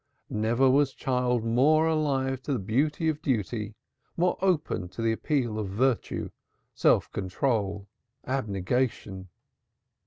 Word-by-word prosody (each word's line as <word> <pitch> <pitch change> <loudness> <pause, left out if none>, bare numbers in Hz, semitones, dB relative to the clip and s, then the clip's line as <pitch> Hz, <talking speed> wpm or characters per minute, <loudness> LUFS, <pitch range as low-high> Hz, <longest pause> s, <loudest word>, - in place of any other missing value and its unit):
Never 115 +5 +2
was 135 +1 +3
child 125 -3 0
more 145 +8 +4
alive 135 -5 0
to 140 - -2
the - - +1
beauty 140 - 0
of 155 -1 -1
duty, 110 - -2 0.4
more 180 +1 +2
open 160 - 0
to 95 - -7
the 115 - +2
appeal 120 -2 -1
of 105 - -2
virtue, 120 +5 -1 0.4
self - - +2
control, 100 0 -1 0.4
abnegation. 105 -4 -2
125 Hz, 120 wpm, -27 LUFS, 105-140 Hz, 0.4 s, more